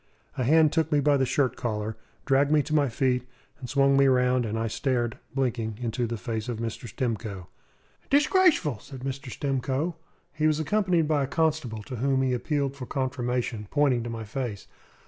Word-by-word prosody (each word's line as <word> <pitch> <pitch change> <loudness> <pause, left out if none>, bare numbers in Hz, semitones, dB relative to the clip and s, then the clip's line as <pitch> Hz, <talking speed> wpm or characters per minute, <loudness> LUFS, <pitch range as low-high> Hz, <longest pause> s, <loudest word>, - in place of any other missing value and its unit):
A 130 - -1
hand 155 +3 +4
took 160 0 +1
me 150 - +4
by 145 +1 +3
the 135 -2 +2
shirt 130 -3 +1
collar, 110 -2 -3 0.3
dragged 140 +1 +3
me 150 -1 +4
to 155 - -5
my 145 -3 +3
feet, 125 0 0 0.3
and 125 -3 -7
swung 140 0 +4
me 140 0 +5
round, 125 -2 +3
and 110 +1 -2
I 115 - -1
stared, 120 +1 -1 0.2
blinking, 115 -5 -1
into 120 0 -1
the 115 0 -3
face 110 +3 -4
of 120 - -3
Mr. 115 +1 -5
Stimcoe. 110 -7 -4 0.6
"Dishgrashful!" 290 - +3
said 135 +2 -10
Mr. 135 +1 -5
Stimcoe. 135 +4 -1 0.4
He 155 0 +1
was 155 0 +2
accompanied 175 -1 +1
by 150 -2 +2
a 135 - 0
constable, 150 -8 -1
to 125 +3 -7
whom 135 +2 +1
he 130 -1 +1
appealed 140 +2 -1
for 130 -3 -7
confirmation, 125 -5 -2
pointing 140 -5 +2
to 120 - -5
my 115 -1 -5
face. 110 -2 -4
130 Hz, 185 wpm, -27 LUFS, 115-145 Hz, 0.6 s, me